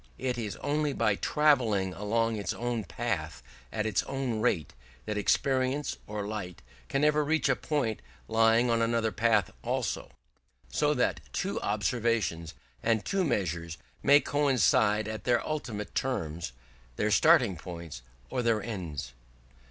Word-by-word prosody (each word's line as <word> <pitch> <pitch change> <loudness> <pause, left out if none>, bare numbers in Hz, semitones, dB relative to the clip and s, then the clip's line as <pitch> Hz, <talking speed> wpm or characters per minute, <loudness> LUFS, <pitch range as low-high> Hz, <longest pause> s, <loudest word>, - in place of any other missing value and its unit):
It 130 -1 -1
is 110 -4 -4
only 150 0 0
by 110 -5 +2
travelling 115 -8 +2
along 115 +3 0
its 100 -2 -2
own 120 -2 -2
path 65 -6 -3 0.3
at 110 -1 -2
its 110 -3 +1
own 135 -5 -2
rate 85 - 0 0.3
that 105 - -2
experience 130 +6 +1
or 105 -1 -4
light 105 -5 -6 0.3
can 135 +1 0
ever 150 0 +4
reach 155 0 +1
a 130 - +3
point 130 -9 -1 0.3
lying 115 +2 +4
on 115 0 +2
another 115 -1 +1
path 110 0 +2
also, - - -2 0.6
so - - +1
that - - +1
two - - -2
observations, 105 - 0 0.3
and 110 -2 +1
two 195 -1 +1
measures, 85 - -1 0.2
may 140 +1 +7
coincide 110 -7 +2
at 110 0 -5
their 120 -2 +2
ultimate 120 -9 -4
terms, 85 - -2 0.4
their 105 +8 0
starting 125 - +5
points 85 -6 -8 0.3
or 125 - 0
their 115 -3 +1
ends. 80 - -5
115 Hz, 140 wpm, -29 LUFS, 100-130 Hz, 0.6 s, may